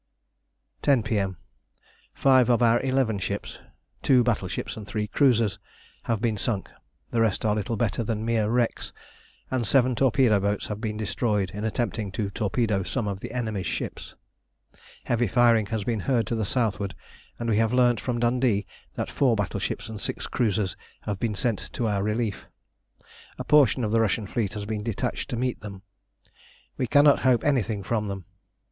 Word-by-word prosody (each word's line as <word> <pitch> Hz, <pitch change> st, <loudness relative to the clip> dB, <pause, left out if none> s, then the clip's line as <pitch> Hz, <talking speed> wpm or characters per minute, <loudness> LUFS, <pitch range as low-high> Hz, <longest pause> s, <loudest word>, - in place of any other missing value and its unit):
10 135 Hz, -6 st, +3 dB
P.M. 100 Hz, -4 st, -1 dB, 0.8 s
Five 130 Hz, -3 st, +4 dB
of 120 Hz, 0 st, +4 dB
our 115 Hz, 0 st, +4 dB
eleven 130 Hz, -5 st, +1 dB
ships 100 Hz, +1 st, -4 dB, 0.4 s
two 125 Hz, -3 st, +4 dB
battleships 105 Hz, -6 st, -2 dB
and 105 Hz, -2 st, -8 dB
three 105 Hz, 0 st, -2 dB
cruisers 115 Hz, -4 st, +2 dB, 0.5 s
have 115 Hz, -2 st, 0 dB
been 110 Hz, -2 st, 0 dB
sunk; 100 Hz, -4 st, -2 dB, 0.4 s
the 115 Hz, -, +1 dB
rest 110 Hz, -1 st, +1 dB
are 105 Hz, -, +3 dB
little 105 Hz, +2 st, -2 dB
better 115 Hz, +1 st, 0 dB
than 110 Hz, 0 st, -2 dB
mere 115 Hz, -2 st, +1 dB
wrecks, 120 Hz, 0 st, 0 dB, 0.6 s
and 125 Hz, -4 st, 0 dB
seven 130 Hz, 0 st, +4 dB
torpedo 125 Hz, -4 st, +3 dB
boats 100 Hz, +1 st, -1 dB
have 105 Hz, 0 st, -4 dB
been 105 Hz, -2 st, -3 dB
destroyed 105 Hz, -1 st, -1 dB
in 105 Hz, +1 st, -6 dB
attempting 110 Hz, -2 st, -2 dB
to 100 Hz, 0 st, -2 dB
torpedo 105 Hz, -1 st, 0 dB
some 110 Hz, +3 st, -2 dB
of 100 Hz, -1 st, -3 dB
the -, -, -7 dB
enemy's 110 Hz, -6 st, -2 dB
ships. -, -, -5 dB, 0.9 s
Heavy 120 Hz, 0 st, +1 dB
firing 115 Hz, -1 st, +4 dB
has 110 Hz, 0 st, -2 dB
been 115 Hz, 0 st, -1 dB
heard 120 Hz, +2 st, +1 dB
to 115 Hz, -, -2 dB
the 110 Hz, -2 st, -1 dB
southward, 100 Hz, -4 st, -1 dB, 0.4 s
and 120 Hz, -, -4 dB
we 110 Hz, -2 st, +2 dB
have 115 Hz, 0 st, +2 dB
learnt 125 Hz, -2 st, +3 dB
from 120 Hz, -2 st, -2 dB
Dundee 120 Hz, -4 st, +2 dB, 0.3 s
that -, -, -2 dB
four 130 Hz, -5 st, +3 dB
battleships 105 Hz, -3 st, -3 dB
and 110 Hz, -2 st, -7 dB
six -, -, -4 dB
cruisers 105 Hz, -5 st, 0 dB, 0.3 s
have 100 Hz, -2 st, -4 dB
been 110 Hz, -3 st, -1 dB
sent 115 Hz, -1 st, -2 dB
to 120 Hz, -, -2 dB
our 100 Hz, -2 st, 0 dB
relief. 105 Hz, 0 st, -2 dB, 0.9 s
A -, -, -4 dB
portion 140 Hz, -4 st, +4 dB
of 105 Hz, -, -1 dB
the 115 Hz, 0 st, +3 dB
Russian 110 Hz, 0 st, 0 dB
fleet 110 Hz, 0 st, -2 dB
has 105 Hz, -1 st, -4 dB
been 105 Hz, 0 st, -3 dB
detached 110 Hz, -1 st, -3 dB
to 120 Hz, -, -3 dB
meet 125 Hz, +1 st, -2 dB
them. 100 Hz, -2 st, -9 dB, 0.9 s
We 125 Hz, -, -1 dB
cannot 145 Hz, +3 st, +5 dB
hope 125 Hz, -3 st, +3 dB
anything 115 Hz, -8 st, 0 dB
from 110 Hz, -1 st, -1 dB
them. 100 Hz, -3 st, -5 dB
110 Hz, 175 wpm, -26 LUFS, 105-120 Hz, 0.9 s, cannot